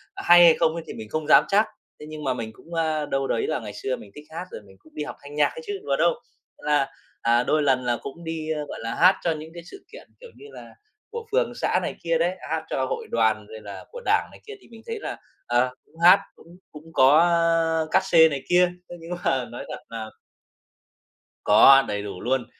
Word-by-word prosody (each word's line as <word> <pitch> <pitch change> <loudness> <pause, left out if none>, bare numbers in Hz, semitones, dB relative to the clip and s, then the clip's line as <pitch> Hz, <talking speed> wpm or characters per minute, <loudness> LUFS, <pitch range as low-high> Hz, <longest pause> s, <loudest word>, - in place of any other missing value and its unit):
hay 175 - +6
hay 170 -1 +8
không 160 -1 +2
ấy 170 - -5
thì - - -7
mình 110 -1 -9
không 155 +4 -3
dám - - +7
chắc. 205 +2 +3 0.3
Thế - - -10
nhưng 155 -1 -8
mà 130 -2 0
mình 115 -3 -5
cũng, 165 +9 -15
a, 160 -2 -1
đâu 135 -1 -2
đấy 115 - -1
là 155 - -1
ngày 105 -3 -8
xưa 130 +5 -3
mình 100 - -14
thích 150 - -12
hát 165 +3 -6
rồi - - -8
mình 95 -2 -19
cũng 155 - -23
đi 150 - -3
học 150 - -7
thanh 145 +1 -10
nhạc 150 -1 +4
ấy - - -7
chứ, 205 -1 -4
đùa 140 -1 0
đâu. 170 +4 +3 0.5
Thế - - -22
là, 145 -2 +3 0.3
à, 120 +1 +3
đôi 150 +3 +1
lần 130 -3 +2
là 120 -1 0
cũng 165 +5 -9
đi, 160 -1 -5
a, 150 - -3
gọi - - -8
là, 115 0 -4
hát 185 +2 +5
cho 170 - +1
những 155 0 -6
cái 170 0 -10
sự 295 - -14
kiện, - - -13
kiểu - - -12
như - - -15
là, - - -12 0.4
của 465 0 -6
phường - - +1
xã - - 0
này - - -4
kia 165 -1 +1
đấy, 175 +3 0
hát 160 0 -2
cho 130 - -1
hội - - -5
đoàn 110 -2 +1
rồi 110 0 -10
là 100 -1 -10
của - - -9
Đảng - - +2
này - - -15
kia 430 - -7
thì - - -20
mình 225 -1 -13
thấy 455 -1 -4
là, - - -6 0.3
ờ, 125 +1 +1
cũng 155 - -29
hát 180 +3 +8 0.2
cũng 170 +2 -17
cũng 160 +2 -14
có, 135 +3 +6
ơ, 165 -1 +2
cát - - +3
sê 165 -3 +6
này 140 -3 -5
kia. 180 0 +4 0.2
Thế 175 - -8
nhưng 165 +1 -10
mà 130 -2 0
nói 120 - -7
thật - - -6
là 110 -1 -6 1.4
Có, 135 0 +7
đầy 105 -1 -3
đủ 100 -3 -7
luôn. 130 -1 -1
155 Hz, 250 wpm, -24 LUFS, 130-170 Hz, 1.4 s, hay